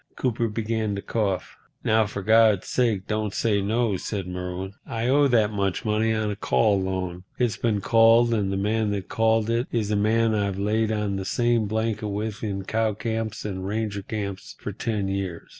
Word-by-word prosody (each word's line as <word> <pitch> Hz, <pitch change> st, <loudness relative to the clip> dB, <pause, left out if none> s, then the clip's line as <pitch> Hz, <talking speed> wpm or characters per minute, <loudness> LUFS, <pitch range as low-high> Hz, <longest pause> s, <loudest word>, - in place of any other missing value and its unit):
Cooper 120 Hz, -2 st, 0 dB
began 110 Hz, -1 st, -2 dB
to 100 Hz, -, -4 dB
cough. 100 Hz, -5 st, -2 dB, 0.3 s
"Now, 110 Hz, -1 st, +3 dB
for 100 Hz, -1 st, -5 dB
God's 110 Hz, -2 st, +5 dB
sake 110 Hz, -7 st, 0 dB
don't 110 Hz, -2 st, -2 dB
say 105 Hz, -3 st, +1 dB
no," 110 Hz, 0 st, +1 dB
said 100 Hz, 0 st, -4 dB
Merwin. 90 Hz, +1 st, -5 dB
"I 115 Hz, +1 st, -3 dB
owe 140 Hz, +2 st, +4 dB
that 110 Hz, -5 st, +3 dB
much 100 Hz, +1 st, -1 dB
money 110 Hz, +1 st, +1 dB
on 110 Hz, -1 st, 0 dB
a -, -, -3 dB
call 100 Hz, -1 st, +2 dB
loan. 95 Hz, -1 st, -3 dB
It's 120 Hz, -4 st, 0 dB
been 110 Hz, -4 st, 0 dB
called, 115 Hz, +2 st, +5 dB
and 100 Hz, -4 st, 0 dB
the 95 Hz, -, -1 dB
man 105 Hz, +2 st, 0 dB
that 100 Hz, -2 st, -4 dB
called 110 Hz, -1 st, +2 dB
it 120 Hz, +2 st, 0 dB
is 110 Hz, -3 st, -1 dB
a -, -, +2 dB
man 110 Hz, +2 st, +2 dB
I've 100 Hz, -2 st, 0 dB
laid 110 Hz, +2 st, +1 dB
on 105 Hz, -2 st, -1 dB
the 95 Hz, -, -3 dB
same 120 Hz, +1 st, +1 dB
blanket 110 Hz, 0 st, -1 dB
with 105 Hz, +1 st, -4 dB
in 100 Hz, -3 st, -2 dB
cow 110 Hz, +1 st, 0 dB
camps 110 Hz, -1 st, -3 dB
and 95 Hz, -3 st, -4 dB
ranger 105 Hz, 0 st, -2 dB
camps 100 Hz, -1 st, -5 dB
for -, -, -5 dB
ten 105 Hz, -4 st, -2 dB
years. 95 Hz, -3 st, -4 dB
105 Hz, 190 wpm, -25 LUFS, 100-115 Hz, 0.3 s, God's